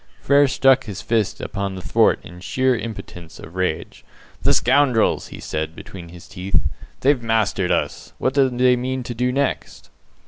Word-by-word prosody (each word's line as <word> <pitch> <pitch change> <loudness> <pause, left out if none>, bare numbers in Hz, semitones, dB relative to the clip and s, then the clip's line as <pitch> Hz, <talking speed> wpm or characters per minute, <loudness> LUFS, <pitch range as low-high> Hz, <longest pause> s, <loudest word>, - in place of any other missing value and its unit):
Frere 140 +1 +4
struck 135 0 +3
his 100 -4 -7
fist 110 -3 0
upon 100 -1 -4
the 95 - -7
thwart - - +3
in 90 +1 -11
sheer 130 +7 +1
impotence 90 -8 -8
of 80 - -11
rage. 95 0 -3 0.4
"The - - +3
scoundrels!" 130 -3 +3
he - - -10
said, 80 +1 -4
between 85 -3 -10
his 85 0 -13
teeth, 95 0 -1 0.4
"they've 135 -1 +3
mastered 110 -5 0
us. - - -2
What 130 - 0
do 135 -1 +4
they 125 0 +3
mean 130 +1 -3
to 120 - -5
do 125 +2 0
next?" 140 +1 -3
115 Hz, 170 wpm, -21 LUFS, 95-130 Hz, 0.4 s, Frere